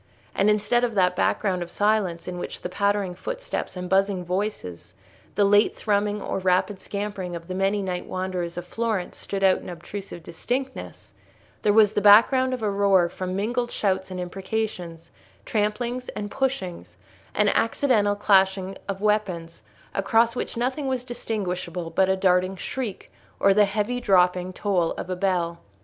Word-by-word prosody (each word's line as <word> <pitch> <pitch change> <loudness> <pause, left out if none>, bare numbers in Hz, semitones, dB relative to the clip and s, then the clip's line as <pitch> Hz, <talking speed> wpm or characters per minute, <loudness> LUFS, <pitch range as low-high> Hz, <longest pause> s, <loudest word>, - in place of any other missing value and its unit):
And 200 - +3
instead 210 +3 +2
of 235 -3 0
that 180 -2 +3
background 185 -1 +1
of 175 - -5
silence 205 -5 0
in 180 -1 -4
which - - -6
the - - -3
pattering 200 0 0
footsteps - - -5
and 180 0 -4
buzzing 190 -1 +1
voices, 180 - -4 0.4
the 205 - +4
lute 205 +2 +4
thrumming 205 0 0
or - - -2
rapid 185 +2 +1
scampering 200 -3 -4
of 170 0 -8
the 185 - -4
many 195 +2 +1
night 180 -2 -3
wanderers 185 -2 -3
of 175 - -4
Florence 220 -2 -2
stood 195 -1 -4
out 190 -1 +5
in - - -9
obtrusive 175 +1 -8
distinctness, 255 +11 -5 0.5
there 210 - +3
was 210 -1 +5
the 205 - +1
background 235 +6 +6
of 250 -3 -3
a 210 - +1
roar 195 -3 +3
from 185 +1 -4
mingled 240 +5 -1
shouts 190 -4 -1
and 185 -1 -5
imprecations, 180 -2 -4 0.3
tramplings 235 +4 -1
and 205 0 -4
pushings, 185 - -3 0.4
and 210 -1 +4
accidental 225 -3 +2
clashing 195 -1 +2
of 195 -1 -4
weapons, 190 -6 -1 0.3
across 225 +4 +2
which 245 - -4
nothing 260 +4 -1
was 260 -2 -1
distinguishable 185 -8 -4
but 190 +3 +2
a 190 - +3
darting 185 0 +2
shriek, 215 +1 -5 0.3
or 195 - +5
the 210 +1 +5
heavy 210 +5 -1
dropping 180 -3 +3
toll 185 -3 0
of 185 - -6
a - - 0
bell. 180 -3 0
195 Hz, 165 wpm, -25 LUFS, 180-215 Hz, 0.5 s, background